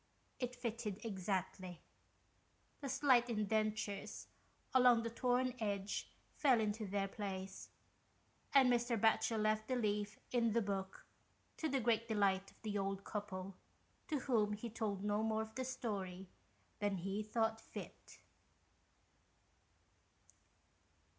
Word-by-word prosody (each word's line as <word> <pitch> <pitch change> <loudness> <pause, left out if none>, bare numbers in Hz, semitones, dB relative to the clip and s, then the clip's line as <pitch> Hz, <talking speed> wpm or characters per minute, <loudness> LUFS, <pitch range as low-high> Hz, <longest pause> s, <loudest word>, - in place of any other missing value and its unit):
It 250 -1 -2
fitted 230 -3 -4
exactly. 185 -3 -2 1.0
The 275 - -4
slight 260 -3 +4
indentures 215 -1 -1 0.4
along 250 -3 +6
the 230 - -2
torn 250 +1 +2
edge 200 -2 -2 0.2
fell 260 -5 +4
into 215 0 -1
their 195 0 0
place, 195 -1 -5 0.8
and 275 -2 +7
Mr. 240 -2 +2
Batchel 220 +1 +3
left 215 0 +1
the 255 - +1
leaf 210 -3 0
in 230 -3 +3
the 235 - +3
book, 195 -1 -3 0.5
to 320 - -1
the 270 -1 +2
great 230 -1 +2
delight 195 -3 +2
of - - -23
the 210 -2 -1
old 195 0 -2
couple, 195 -3 -4 0.5
to 300 -6 -1
whom 215 -6 +2
he 215 +2 -5
told 205 -3 -2
no 210 +1 +1
more 220 0 +1
of 220 0 -10
the 260 - -2
story 200 -8 -3 0.5
than 205 -2 +1
he 195 +4 -2
thought 225 +1 0
fit. - - -10
215 Hz, 125 wpm, -38 LUFS, 200-235 Hz, 1.0 s, and